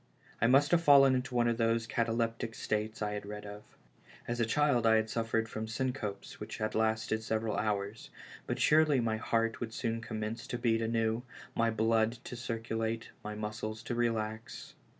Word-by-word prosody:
I 115 - +5
must 135 +3 +5
have 170 -1 +5
fallen 140 -4 +7
into 125 0 -2
one 120 -1 +3
of 115 -1 +1
those 115 0 +2
cataleptic 115 0 -1
states 110 0 -2
I 105 0 -1
had 105 - -4
read 105 +1 -7
of. 105 0 -8 0.7
As 120 0 -2
a 115 - +2
child 135 -3 +3
I 110 - +6
had 110 0 +1
suffered 115 0 0
from 110 0 -5
syncopes 120 -4 -4
which - - -6
had 110 0 -2
lasted 110 0 +1
several 110 0 -1
hours, 105 0 -2 0.4
but - - -1
surely 155 -3 +5
my 115 -2 0
heart 115 +1 0
would 115 -2 -5
soon 115 -1 -2
commence 110 0 -4
to 120 - -3
beat 115 -2 +1
anew, 115 0 0 0.3
my 115 0 +2
blood 110 0 +2
to - - -7
circulate, 115 -1 -3
my 105 0 -5
muscles 110 +1 -4
to - - -3
relax. 110 -2 -2
115 Hz, 180 wpm, -32 LUFS, 110-120 Hz, 0.7 s, fallen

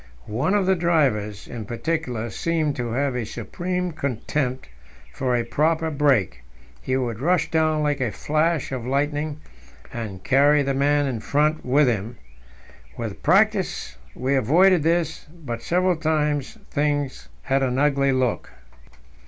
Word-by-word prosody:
One 130 - 0
of 200 -2 +2
the 190 - +4
drivers, 135 - 0
in 115 -3 -6
particular, 120 -2 -3
seemed 155 - -1
to 120 -2 -3
have 135 0 0
a 125 - -1
supreme 175 - -3
contempt 135 - -2 0.5
for 125 - 0
a 120 - +1
proper 160 +1 +1
brake; 135 - +1 0.4
he 130 - -1
would 120 -4 -2
rush 160 +2 +1
down 155 -1 +2
like 145 -2 0
a 120 -4 0
flash 155 +2 0
of 130 -3 -3
lightning, 145 +2 -1 0.5
and 100 -6 -6
carry 145 +4 +4
the 135 0 0
man 145 +2 +2
in 125 -5 -2
front 150 +6 +1
with 135 +3 +3
him. 115 0 -2 0.8
With 110 -4 -5
practice 195 - +2 0.2
we 130 +2 -1
avoided 165 - +4
this, 165 0 0 0.2
but 120 -2 -4
several 180 +6 +1
times 150 -3 -1
things 145 - -1
had 135 +1 +1
an 130 -1 0
ugly 140 -1 +2
look. 130 -3 0
140 Hz, 145 wpm, -23 LUFS, 125-160 Hz, 0.8 s, the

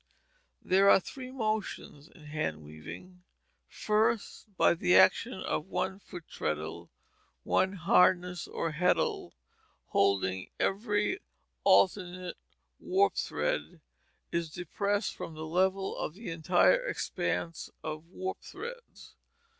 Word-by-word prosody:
There 195 +2 +5
are - - +8
three 255 +7 -8
motions 215 - -3
in 160 - -18
hand 150 - -3
weaving. 80 - -11 0.5
First: 215 +1 0
by - - +5
the 180 +1 +2
action 240 - +5
of 185 -3 -3
one 190 0 -2
foot 175 -4 -10
treadle 80 +3 -4 0.5
one 190 +1 +2
harness 180 -1 +3
or 165 - -2
heddle, 180 +4 +1 0.6
holding 95 -1 +1
every 205 - 0 0.4
alternate 180 -2 +2 0.4
warp 390 +2 +2
thread, - - -2 0.5
is 170 -1 -1
depressed 200 +5 -1
from 160 - -7
the 155 0 -6
level 190 +4 +1
of 155 - -4
the 205 -3 -7
entire 175 - +3
expanse 170 - -3
of 155 +1 -5
warp 185 +1 -5
threads. 475 +4 -10
180 Hz, 110 wpm, -30 LUFS, 160-205 Hz, 0.6 s, are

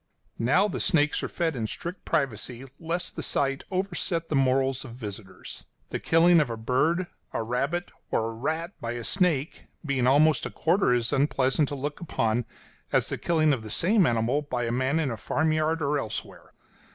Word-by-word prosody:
Now 155 - +3
the 205 - -4
snakes 150 -2 +2
are - - -2
fed 165 -3 -1
in 115 -3 -2
strict 175 - -7
privacy 130 -4 -1
lest 170 +2 -3
the - - -4
sight 135 0 +1
overset 180 -3 -2
the 155 - 0
morals 135 0 +2
of 120 -4 -10
visitors; 100 -5 -8 0.3
the - - -2
killing 170 +1 +5
of 145 - -1
a 115 - -4
bird, 140 +10 +1 0.3
a 115 - -1
rabbit, 140 +10 -2 0.2
or 110 - 0
a 115 - -4
rat 160 +9 -3
by 115 0 -3
a 120 -1 -5
snake 165 - 0 0.2
being 130 -4 +1
almost 150 +4 +4
a - - -7
quarter 170 -2 +2
as 120 -2 +1
unpleasant 135 +1 +2
to 145 - -4
look 145 +2 -4
upon 115 -7 0 0.5
as - - +2
the - - -2
killing 155 -3 +2
of 125 - -2
the 110 - -9
same 185 - +3
animal 120 +5 +1
by 125 -4 -3
a 115 - -1
man 130 +5 +1
in 145 -5 0
a 115 - -4
farmyard 155 +6 0
or 145 +1 +1
elsewhere. 110 -4 -6
140 Hz, 190 wpm, -27 LUFS, 120-165 Hz, 0.5 s, killing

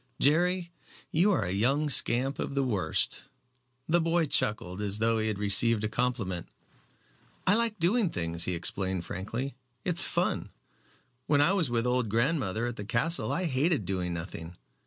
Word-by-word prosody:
"Jerry, 175 +4 +2 0.4
you 180 +7 +3
are 190 - +1
a 90 - -3
young 135 +10 +1
scamp 135 0 +2
of 140 - -4
the 140 - +1
worst." 100 -11 -1 0.6
The 170 +1 +3
boy 165 0 +1
chuckled 105 -8 +1
as 100 0 +1
though 115 +1 +1
he 110 - -1
had 105 -2 -2
received 105 +2 +3
a - - +1
compliment. 110 -7 -2 1.0
"I 190 - +6
like 230 0 +2
doing 195 +4 +2
things," 85 - -1
he 90 - -1
explained 95 +1 -3
frankly; 115 +9 -5 0.3
"it's 175 -1 +5
fun. - - 0 0.8
When 145 -1 +3
I 145 +7 +4
was 175 -9 +1
with 120 0 0
old 125 -2 0
grandmother 115 - 0
at 120 -1 -4
the 105 - -5
castle 120 - -1
I 185 - -1
hated 145 - 0
doing 90 -1 -2
nothing. 85 0 -7
120 Hz, 165 wpm, -28 LUFS, 100-160 Hz, 1.0 s, I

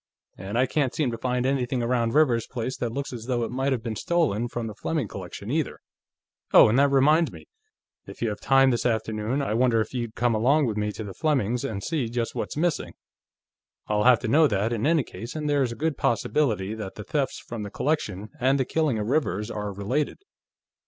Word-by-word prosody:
And 95 +5 -5
I 130 - +4
can't 135 -1 0
seem 145 -6 0
to 115 - -4
find 125 +1 -1
anything 130 -2 0
around 115 0 0
Rivers's 125 -7 +3
place 130 +1 -4
that 120 - -2
looks 140 +2 -4
as 115 -2 -7
though 120 -2 0
it 115 - -3
might 135 +2 0
have 125 -4 -1
been 115 -2 -3
stolen 125 - 0
from 120 -1 -4
the 110 - -5
Fleming 145 +4 -2
collection, 95 +3 -7
either.... 155 0 -1 0.7
Oh, - - +8
and 120 +5 +3
that 140 0 +5
reminds 150 +4 +4
me: - - -12 0.6
If - - -10
you 115 - 0
have 105 - -5
time 135 -1 +4
this 120 - 0
afternoon, 110 +3 -1
I 120 - -1
wonder 120 0 +3
if 110 - -2
you'd 120 -3 -4
come 120 -1 +1
along 135 +7 +3
with 110 -4 -1
me 105 0 -1
to 110 - -6
the 100 -2 -7
Flemings' 125 -6 0
and 100 -3 -4
see 145 -8 -1
just 120 0 -2
what's - - -4
missing. 170 0 -1 0.9
I'll 105 +1 0
have 125 -1 +7
to 125 - -3
know 155 +7 +5
that, 105 +1 0
in 115 +4 0
any 160 -3 +3
case, 115 +5 -9
and 150 -1 -3
there's 140 -4 +1
a - - -5
good 155 +1 -2
possibility 110 -5 0
that 105 -3 -6
the 105 - -7
thefts 140 +4 -1
from 115 -2 -7
the 105 - -5
collection 105 -8 -2
and 135 +2 +2
the 130 - +1
killing 155 -6 0
of 105 - -2
Rivers 115 - 0
are 105 -2 -4
related." 105 +10 -2
120 Hz, 220 wpm, -25 LUFS, 110-140 Hz, 0.9 s, Oh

